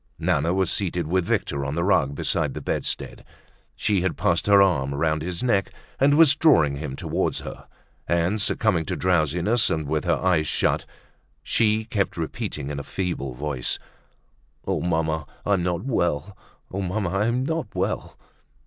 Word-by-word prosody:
Nana 80 -1 +1
was 95 0 +1
seated 90 -4 -1
with 90 +3 +1
Victor 70 -4 -1
on 70 +1 -3
the 85 - 0
rug 75 -8 +2
beside - - -1
the - - -3
bedstead, - - -3 0.5
she 100 -3 +1
had 95 -1 -1
passed 85 +3 +1
her 100 -1 +7
arm 75 -8 +2
round 75 +1 0
his 90 +6 -4
neck 100 -7 +1 0.3
and 145 +2 +4
was 155 -3 +7
drawing 80 - +4
him 70 -2 -5
towards - - -2
her; - - -9 0.4
and, 85 +5 +1
succumbing 100 -5 +1
to - - -2
drowsiness 90 - +2
and 80 -2 -1
with 75 +1 -1
her - - +3
eyes 90 -4 +1
shut, - - 0 0.6
she 110 -1 +2
kept 100 -5 -1
repeating 80 -3 -4
in 70 - -4
a - - -5
feeble 70 -8 -3
voice: 70 -2 -2 0.9
"Oh! - - -1
Mamma, 80 -3 -1 0.2
I'm 100 -3 +2
not 90 -1 -1
well; 90 - -1 0.4
oh! 95 - -3
mamma, 95 0 -1
I'm 115 +7 0
not 160 +2 -2
well." - - -2
90 Hz, 165 wpm, -24 LUFS, 75-100 Hz, 0.9 s, her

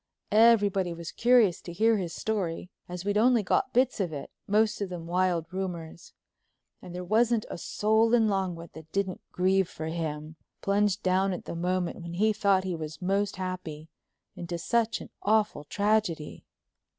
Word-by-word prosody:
Everybody 205 -5 +4
was 170 -1 -7
curious 235 -7 +4
to 175 - -8
hear 220 +5 +3
his 180 -4 -3
story, 185 -5 -3 0.2
as 180 +1 -6
we'd 205 +1 +1
only 240 -1 +4
got 225 - +1
bits 255 -1 +2
of 180 -5 -1
it, 145 -2 -7 0.2
most 210 +1 +2
of 200 - -2
them 175 -2 -6
wild 175 -1 +1
rumors. 175 -3 -6 0.7
And 180 -1 -9
there 180 - -4
wasn't 225 +4 +2
a - - -5
soul 220 +5 +2
in 225 -2 +3
Longwood 185 -4 -2
that 160 0 -12
didn't 195 -1 -2
grieve 190 0 +2
for 155 - -7
him, 155 -1 -4 0.3
plunged 200 0 +1
down 190 +1 +2
at 180 - -6
the - - -5
moment 180 +1 -2
when 170 0 -7
he 215 +4 +3
thought 200 -3 +2
he 185 -2 -2
was 155 -1 -6
most 195 +2 0
happy 175 -4 -6 0.5
into 175 0 -5
such 230 +6 0
an - - -11
awful 210 -7 +1
tragedy. 205 -4 -1
185 Hz, 170 wpm, -28 LUFS, 170-210 Hz, 0.7 s, Everybody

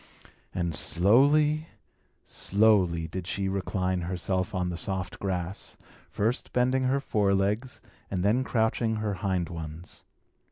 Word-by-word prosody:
And 85 -2 -2
slowly, 145 - +4 0.6
slowly 95 -6 +2
did 90 +1 -6
she 95 +1 -2
recline 95 -1 -1
herself 95 +3 -2
on 90 -1 0
the 90 - -4
soft 95 +1 -3
grass, 95 -1 -4 0.3
first 115 +5 -1
bending 130 +1 +2
her 135 +2 +2
fore 100 -7 +1
legs, 105 +6 -1 0.3
and 90 -2 -2
then 115 +6 +3
crouching 110 -1 0
her 105 -1 -2
hind 95 -4 0
ones. 80 0 -8
100 Hz, 125 wpm, -28 LUFS, 90-110 Hz, 0.6 s, slowly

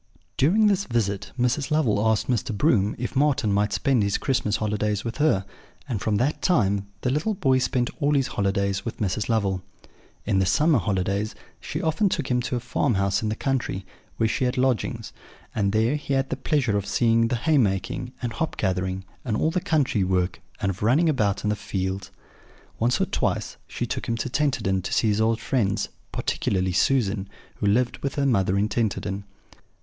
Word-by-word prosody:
During 195 +11 +4
this 200 -1 +2
visit, 105 -5 -1
Mrs. 125 +3 +1
Lovel 120 -10 +2
asked 110 -1 +2
Mr. 115 -3 -1
Broom 105 -7 +2
if 125 +3 -4
Marten 135 -7 +2
might 105 +1 +1
spend 135 -4 +2
his 100 -1 +1
Christmas 115 -6 0
holidays 105 -1 -1
with 115 - -4
her; 145 -11 +2 0.4
and 115 -7 -3
from 110 - 0
that 130 +8 0
time 100 - +2
the 125 - 0
little 160 +10 0
boy 135 -7 +2
spent 125 -1 0
all 145 -1 +2
his 135 -2 +3
holidays 100 0 0
with 115 - -5
Mrs. 105 +1 -1
Lovel. 100 -5 +1 0.6
In 95 - +2
the 95 - +2
summer 150 - +4
holidays 100 +2 -1 0.2
she - - -5
often 175 +6 +2
took 155 -7 -2
him 125 0 +2
to 125 - -2
a - - 0
farmhouse 100 -5 0
in 110 - -1
the 110 - -1
country, 125 -7 -2 0.3
where 115 - +2
she 125 - 0
had 125 - -1
lodgings; 125 -6 0 0.4
and 100 -2 +1
there 110 +6 +2
he 140 -2 -2
had 135 0 0
the - - +1
pleasure 135 -9 0
of 100 -1 -1
seeing 115 +3 +3
the 120 - 0
haymaking, 120 - +1
and 120 -2 -2
hop 160 +7 -3
gathering, 95 -1 -1 0.2
and 110 -4 -1
all 160 - +1
the 180 - 0
country 140 - +1
work, 90 -1 0 0.2
and 100 - 0
of 95 - -9
running 140 +10 +3
about 105 -9 +1
the 105 0 +1
fields. 95 -1 -3 0.7
Once 120 +3 +2
or - - +3
twice - - -1
she - - -3
took - - -4
him 115 - 0
to 120 - -3
Tenterden 125 -11 +1
to 90 - -5
see 110 - +3
his 105 +1 +1
old 110 +1 +2
friends, 105 -7 0 0.2
particularly 95 -1 -1
Susan, 100 0 +1 0.3
who 105 - -1
lived 120 +4 +2
with 140 - -3
her 140 - +1
mother 100 -7 +2
in 100 +2 +2
Tenterden. 100 -3 -2
110 Hz, 190 wpm, -25 LUFS, 100-135 Hz, 0.7 s, During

